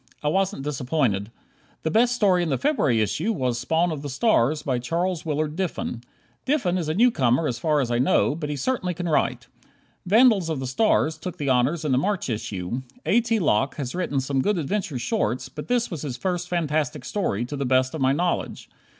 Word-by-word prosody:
I 150 - +2
wasn't 190 -4 0
disappointed. 130 -7 -1 0.5
The 160 - 0
best 240 +2 +3
story 190 -6 +3
in 170 - -1
the 135 - +1
February 150 - +2
issue 160 - 0
was 125 - -1
"Spawn 160 +7 +1
of 150 -3 -4
the 145 - -5
Stars," 150 - +2
by 130 -3 0
Charles 170 +6 -2
Willard 150 0 -1
Diffin. 175 -9 -3 0.4
Diffin 260 -11 +1
is 160 -3 -3
a 155 - -1
newcomer 155 - +3
as 120 -3 -3
far 150 +1 +2
as 120 -3 -2
I 120 - +1
know, 135 +2 +3
but 150 -1 -5
he 150 - -2
certainly 180 - -1
can 175 +1 -3
write. 155 - 0 0.6
"Vandals 215 -4 +5
of 155 -4 -2
the 130 - -4
Stars" 155 - +1
took 180 - -6
the 145 -2 -2
honors 135 +6 +1
in 150 - 0
the 130 - +3
March 195 -3 -1
issue. 105 +1 -4 0.2
A. 235 - +4
T. 230 -1 0
Locke 135 - +1
has 130 -4 -4
written 175 -6 -1
some 135 0 0
good 205 +6 +1
adventure 175 -2 -2
shorts, 120 +1 -1
but 150 +3 -8
this 245 -3 0
was 165 -5 -4
his 130 -5 -4
first 180 +2 -2
fantastic 155 -6 -1
story, 120 - -1
to 145 - -6
the 140 - -2
best 130 0 +2
of 160 - -4
my 130 0 +4
knowledge. 175 +5 -2
150 Hz, 210 wpm, -24 LUFS, 130-180 Hz, 0.6 s, Vandals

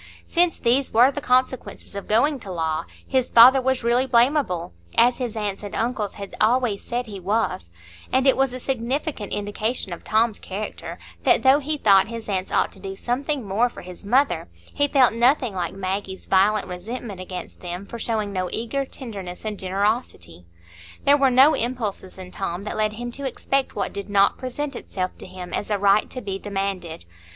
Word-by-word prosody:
Since 345 -1 +2
these 255 +3 +1
were 245 +4 +6
the 290 - -5
consequences 255 -2 0
of 200 -1 -6
going 270 +7 +2
to 195 - -8
law, 160 -2 -1 0.2
his 260 -2 +1
father 255 +3 +8
was 260 -1 0
really 240 +3 +2
blamable, 240 - +2 0.3
as 245 +2 +5
his 240 -3 -3
aunts 205 -3 -3
and 205 -1 -7
uncles 225 -3 -2
had 200 -1 -8
always 225 -2 +2
said 245 +1 -3
he 205 -4 -8
was; 190 - -1 0.4
and 260 +1 +2
it 270 - +5
was 270 -1 +2
a 255 - -6
significant 260 -1 -3
indication 205 0 -2
of 175 - -9
Tom's 220 0 +1
character, 205 +3 -6 0.2
that - - +3
though 265 +2 +6
he 300 +1 -2
thought 195 -7 +5
his 230 0 -7
aunts 190 -2 -2
ought - - +2
to 195 - -14
do 195 0 -6
something 255 +2 -2
more 220 +6 +2
for - - -11
his 180 +1 -11
mother, 205 - +1 0.2
he 285 - +2
felt 265 -5 +4
nothing 245 0 +3
like 180 -1 -3
Maggie's 190 0 -4
violent 200 +2 +3
resentment 200 +2 -6
against 185 0 -8
them 180 +2 -6
for 235 - -8
showing 215 -3 -2
no 185 -1 -2
eager 235 +5 -2
tenderness 200 -9 -8
and 210 -2 -4
generosity. 190 - -2 0.6
There 285 - +7
were 275 -2 +4
no 265 +5 +6
impulses 225 -6 -3
in 185 -1 -9
Tom 190 -1 -4
that 210 - -4
led 215 0 0
him 240 +2 -5
to 275 +2 -5
expect 270 +1 -1
what 200 - -2
did 200 0 -6
not 200 0 +3
present 275 +2 -4
itself 185 -5 -4
to - - -9
him 180 -1 -9
as 205 - -2
a 205 - +1
right 200 +1 +3
to 255 - -6
be 195 -3 -4
demanded. 195 - -4
215 Hz, 190 wpm, -23 LUFS, 195-255 Hz, 0.6 s, father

